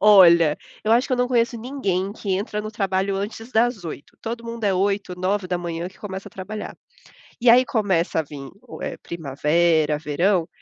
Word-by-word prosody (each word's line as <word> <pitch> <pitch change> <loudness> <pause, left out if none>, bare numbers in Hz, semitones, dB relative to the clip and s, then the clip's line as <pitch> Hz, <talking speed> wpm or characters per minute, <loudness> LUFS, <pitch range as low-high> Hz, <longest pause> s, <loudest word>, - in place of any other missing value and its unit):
Olha, 170 -7 +7 0.3
eu 215 - +1
acho 245 +3 +4
que - - -3
eu - - +3
não 250 0 +1
conheço 235 -1 +2
ninguém 200 -7 -2
que 205 -2 -6
entra 210 +2 -2
no 215 0 -6
trabalho 195 -1 0
antes 225 +4 -5
das 225 -4 +2
8. 155 -3 -8
Todo 235 +1 -5
mundo 230 -1 -5
é 195 -2 +3
8h, 195 0 0
9h 180 -3 -2
que 190 - -20
começa 195 0 -6
a - - -24
trabalhar. 210 +3 -7 0.6
E 240 -1 +4
aí 250 +2 +7
começa 190 -7 +1
a - - 0
vim 140 -2 -9 0.3
é - - -4
primavera, 155 0 +1
verão. 165 +4 +1
195 Hz, 180 wpm, -23 LUFS, 170-220 Hz, 0.6 s, Olha